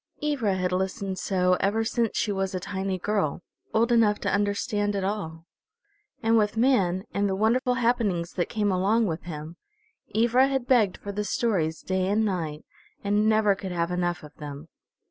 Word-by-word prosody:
Ivra 260 -10 +1
had 180 -1 -1
listened 190 +1 -2
so 180 -1 +2
ever 210 +3 +1
since 230 0 -1
she 210 - +1
was 195 -1 -2
a - - -1
tiny 190 +1 -3
girl, 185 -4 -1 0.3
old 230 +2 +2
enough 220 -3 +4
to - - -1
understand 205 0 0
at 195 - -1
all. 170 -5 -4 0.8
And 225 0 +4
with 210 +1 0
man, 195 -7 +2
and 200 0 +1
the 190 - 0
wonderful 245 +5 +2
happenings 225 -8 0
that 175 - -1
came 210 -3 0
along 200 +5 +2
with 165 -3 -2
him, 160 0 -7 0.6
Ivra 240 +4 +4
had 270 -2 -1
begged 230 -7 +3
for 200 - -6
the 210 +1 -2
stories 190 -7 0
day 185 0 0
and 215 +3 +2
night, 165 -6 -3 0.4
and 205 +2 +2
never 215 -2 +4
could 190 -1 -6
have 170 0 -1
enough 175 -1 -1
of 150 -1 -12
them. 145 +1 -8
200 Hz, 180 wpm, -26 LUFS, 180-220 Hz, 0.8 s, enough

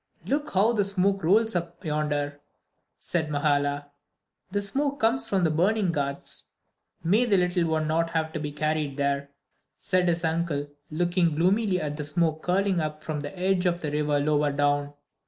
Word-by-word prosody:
"Look 290 -3 -2
how 210 +5 +4
the 210 -3 +2
smoke 195 0 +1
rolls 220 +5 +3
up 170 0 -4
yonder," 145 -1 -1 0.6
said 160 -3 -2
Mahala. 145 -1 0 0.6
"The 205 +1 -1
smoke 280 +7 -1
comes 230 +4 +2
from 190 -2 +1
the 160 - +3
burning 190 +4 +2
'ghats.' 140 -3 -4 0.5
May 205 +9 +3
the 205 -5 +3
little 180 -1 +2
one 160 -1 0
not 165 +2 +1
have 160 -1 -1
to - - -3
be 150 -1 -4
carried 150 -1 -1
there," 140 0 0 0.5
said 185 -2 +1
his 170 0 +1
uncle, 160 -3 -1 0.2
looking 175 0 +1
gloomily 185 +3 +2
at 150 -2 -3
the 150 - -3
smoke 155 +1 0
curling 190 0 +1
up 155 -1 -4
from 155 -1 -3
the 145 +6 -7
edge 185 0 +1
of 175 0 0
the 150 - -3
river 150 -1 +1
lower 150 0 +2
down. 145 0 +1
165 Hz, 175 wpm, -26 LUFS, 150-185 Hz, 0.6 s, how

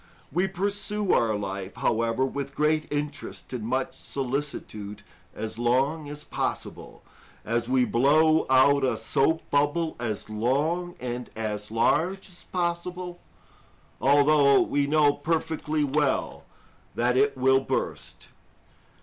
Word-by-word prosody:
We 180 +6 +1
pursue 200 +1 -1
our 110 -2 +2
life, 100 -1 -5
however, 115 +3 +1
with 140 0 -5
great 155 +1 +1
interest 145 -2 -5
and 120 -4 -4
much 130 +4 -1
solicitude 125 -7 -4 0.3
as 110 +1 -5
long 135 +6 +1
as 150 0 -7
possible, - - -5 0.4
as 115 +1 -1
we 130 -1 +3
blow 155 +7 +3
out 135 +2 +5
a 125 -4 +1
soap 135 +8 +1
bubble 145 +3 +1
as 110 -4 -3
long 145 +11 -1
and 125 0 -5
as 105 -2 -4
large 175 - +1
as 175 - -16
possible, 175 0 -3 0.8
although 140 0 +5
we 140 0 +1
know 150 -1 +4
perfectly 155 0 -1
well 145 0 0 0.5
that 125 +1 +1
it 140 +1 +2
will 130 +1 +4
burst. 135 - -4
140 Hz, 120 wpm, -26 LUFS, 120-155 Hz, 0.8 s, out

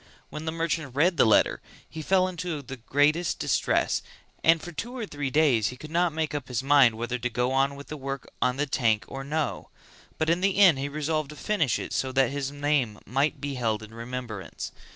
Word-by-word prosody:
When 150 +1 -6
the 160 - -1
merchant 165 -4 -2
read 170 +4 +3
the - - +5
letter 110 - +3 0.3
he 160 - -7
fell 185 +3 +3
into 175 -4 -4
the 135 +1 -8
greatest 145 +7 +1
distress - - +1 0.4
and 165 0 +5
for 175 - -8
two 240 +10 -6
or 230 - -3
three 145 -7 -4
days 130 -7 +3
he 125 - -6
could 155 +4 -10
not 175 +1 +2
make 155 -1 -2
up 145 -4 -4
his 125 0 -2
mind 135 -5 +5
whether 120 +2 -3
to 125 +1 -1
go 125 +2 0
on 135 +1 +2
with 140 0 -9
the 150 - -5
work 135 -1 -5
on 125 0 +2
the 145 - +1
tank 115 -6 +1
or 135 0 -6
no; 150 +2 -2 0.5
but 160 - 0
in 170 +2 +2
the 195 0 +1
end 180 -9 +6
he 140 +1 -2
resolved 155 0 -2
to 150 - -9
finish 155 - 0
it - - -6
so 130 - -1
that 135 -2 +3
his 140 -1 -2
name 145 -6 0
might 135 +6 0
be 145 -1 -4
held 110 -4 -1
in 110 +1 -12
remembrance. 115 -5 -6
145 Hz, 220 wpm, -27 LUFS, 125-160 Hz, 0.5 s, end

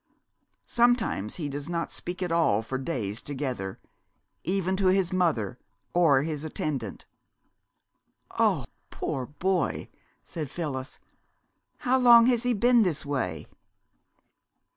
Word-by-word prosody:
Sometimes 235 - +1
he 155 -5 -3
does 145 +2 -5
not 170 -1 -2
speak 180 +1 -5
at 175 - -2
all 160 -11 +3
for 130 +4 -3
days 115 -8 -3
together, 130 -9 -4 0.6
even 190 +1 0
to 195 -1 +2
his 185 0 +2
mother, 130 - 0 0.3
or 150 -6 +4
his 155 -2 -3
attendant." 140 -8 -4 1.3
"Oh, - - +2 0.2
poor 130 -2 -3
boy!" 180 +4 -1 0.4
said 155 -5 -5
Phyllis. 145 -5 -5 0.8
"How 260 +1 +2
long 235 -2 +8
has 245 -2 +3
he 245 -1 +1
been 240 +3 +5
this 165 -7 0
way?" 130 - -2
165 Hz, 120 wpm, -27 LUFS, 130-190 Hz, 1.3 s, long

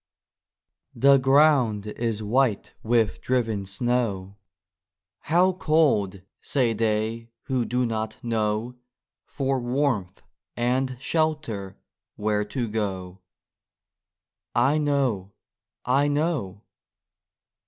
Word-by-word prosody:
THE 140 +1 +6
ground 135 -6 +3
is 110 0 -3
white 115 -1 +1
with 115 -2 +1
driven 110 -6 -1
snow 100 -3 -1 0.4
" 90 0 -67
How 180 +4 +4
cold! 140 - +1
" - - -65
say 125 -5 +1
they 110 +1 -1
who 130 -3 -1
do 125 +2 0
not 110 -1 -3
know 115 +1 -1 0.5
For 135 -2 -1
warmth 120 -7 -1 0.3
and 130 +2 0
shelter 145 - -2 0.4
where 105 0 0
to 120 +2 -3
go, 95 -4 -4 1.4
(/know! 135 -9 +1 0.5
/know!) 140 - 0
115 Hz, 90 wpm, -25 LUFS, 105-135 Hz, 1.4 s, THE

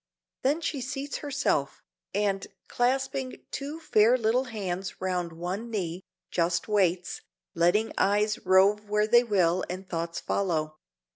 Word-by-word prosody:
Then 290 +5 +1
she 290 -4 -2
seats 270 +3 -4
herself, 270 - -1 0.3
and, 200 -1 0 0.2
clasping 260 +1 -1
two 290 +3 -5
fair 245 -5 +4
little 240 +3 +1
hands 195 -5 -4
round 180 -2 -1
one 180 +8 -4
knee, 180 -5 -3 0.3
just 170 0 0
waits, 185 -4 +1 0.3
letting 175 +7 +2
eyes 210 +1 +2
rove 200 +3 +4
where 210 0 +3
they 240 +3 +5
will 185 -5 +2
and 185 +1 -6
thoughts 170 -1 -3
follow. 155 -5 -1
205 Hz, 130 wpm, -28 LUFS, 180-245 Hz, 0.3 s, they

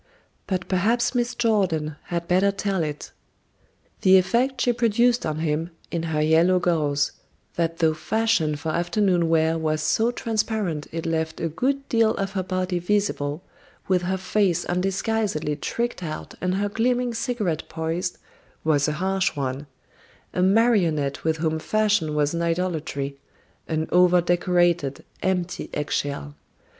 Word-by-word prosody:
But 185 -2 -2
perhaps 225 +7 +1
Miss 245 -1 0
Jordan 185 -10 +1
had 170 -1 -3
better 190 +3 +3
tell 195 -2 -1
it: 150 -2 -4 0.9
"The 190 0 +7
effect 240 +7 +1
she 245 - +3
produced 235 0 +2
on 155 -1 -2
him, 160 +1 -1 0.2
in 170 - -1
her 160 -2 0
yellow 165 +4 +4
gauze, 150 -5 +1 0.4
that 165 -1 -1
though 160 -2 +3
fashioned 160 -4 0
for 160 - -3
afternoon 175 +1 +1
wear 165 0 +2
was 155 -1 0
so 225 +2 +2
transparent 215 -9 -2
it 165 0 -4
left 160 -1 -1
a 165 - 0
good 275 - -1
deal 225 -1 +3
of 195 -1 -2
her 195 -1 -1
body 185 -1 -1
visible, 175 -5 -1 0.4
with 185 -2 +2
her 190 +2 -1
face 190 -2 +1
undisguisedly 190 -3 -1
tricked 235 +7 -3
out 155 -3 -6
and 180 0 0
her 205 +1 0
gleaming 245 +3 0
cigarette 225 - -2
poised, 165 +2 -3 0.5
was 150 -2 +2
a 150 - 0
harsh 190 +2 0
one 140 0 -3 0.7
a 180 - 0
marionette 185 - +2
with 160 0 +1
whom 160 0 -1
fashion 210 -5 +1
was 150 0 +1
an 170 - -1
idolatry; 160 -5 -2 0.5
an 160 0 -1
over 180 0 +5
decorated, 175 -4 +1 0.2
empty 180 -2 -1
eggshell. 145 0 -2
175 Hz, 145 wpm, -24 LUFS, 160-205 Hz, 0.9 s, The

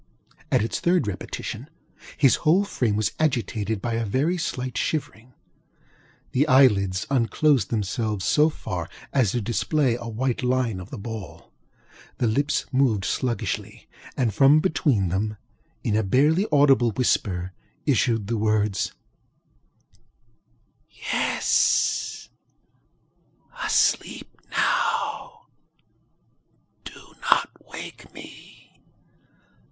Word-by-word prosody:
At - - +3
its 115 - -2
third 175 -3 +2
repetition, 105 - -6 0.5
his 135 -3 +4
whole 175 +6 +3
frame 120 - -1
was 110 0 0
agitated 115 -8 -1
by 120 - -1
a 115 0 -1
very 135 - 0
slight 130 -8 -4
shivering; 125 -1 -3 1.0
the 145 +4 +2
eyelids 105 -9 +4
unclosed 135 0 +2
themselves 105 -2 -2
so 150 - +4
far 90 - -5 0.2
as 130 -7 +3
to 120 - 0
display 125 +4 0
a 120 0 -6
white 120 +2 -2
line 125 -5 0
of 90 +2 -10
the 135 - -7
ball; 110 -1 -8 0.7
the - - 0
lips 140 +6 0
moved 125 -7 +2
sluggishly, 125 -2 -3 0.3
and 120 -5 +1
from 140 +7 +6
between 140 - +1
them, 105 +4 -2 0.5
in 105 - 0
a 110 - +3
barely 150 - +2
audible 140 -5 +5
whisper, 95 -7 0 0.3
issued 115 -6 +1
the 115 +3 -2
words: 105 -2 0 2.0
ŌĆ£Yes; - - 0 1.3
ŌĆöasleep - - +1 0.2
now. - - -1 1.4
Do - - -12 0.2
not - - +3 0.2
wake - - -9
me! - - -14
120 Hz, 105 wpm, -24 LUFS, 105-135 Hz, 2.0 s, from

